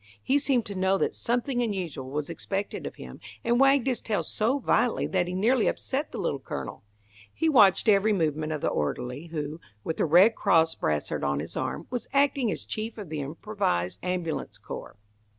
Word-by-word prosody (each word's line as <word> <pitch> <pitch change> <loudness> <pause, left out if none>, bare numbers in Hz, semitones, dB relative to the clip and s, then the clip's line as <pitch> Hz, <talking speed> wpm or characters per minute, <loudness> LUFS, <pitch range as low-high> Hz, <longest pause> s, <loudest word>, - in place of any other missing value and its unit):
He 280 +2 +3
seemed 265 -5 +1
to 200 - -5
know 190 0 +2
that - - 0
something 245 +1 0
unusual 180 - -3
was 145 +1 -3
expected 195 +4 -4
of - - -8
him, - - -10 0.2
and 240 -1 +2
wagged 275 -1 +5
his 255 -3 0
tail 215 -2 -1
so 235 +6 +1
violently 245 -2 +1
that 180 -2 0
he 180 - -3
nearly 230 +5 +3
upset 280 +3 -2
the - - -6
Little 140 - -1
Colonel. 70 - -6 0.5
He 325 - -1
watched 215 - +5
every 210 0 +5
movement 155 -5 0
of 155 -2 -3
the - - +1
orderly, 125 - -3
who, 155 0 -5 0.2
with 160 - -3
a - - +3
Red 180 +8 +6
Cross 165 -6 +3
brassard 75 -1 -2
on 70 0 0
his 75 - -6
arm, 130 +5 -3
was 245 -2 -3
acting 275 -4 +3
as - - -5
chief 220 +1 -4
of 205 -6 -7
the 155 -1 -3
improvised 145 - -2
ambulance 180 -3 -3
corps. - - -8
190 Hz, 190 wpm, -27 LUFS, 155-235 Hz, 0.5 s, Red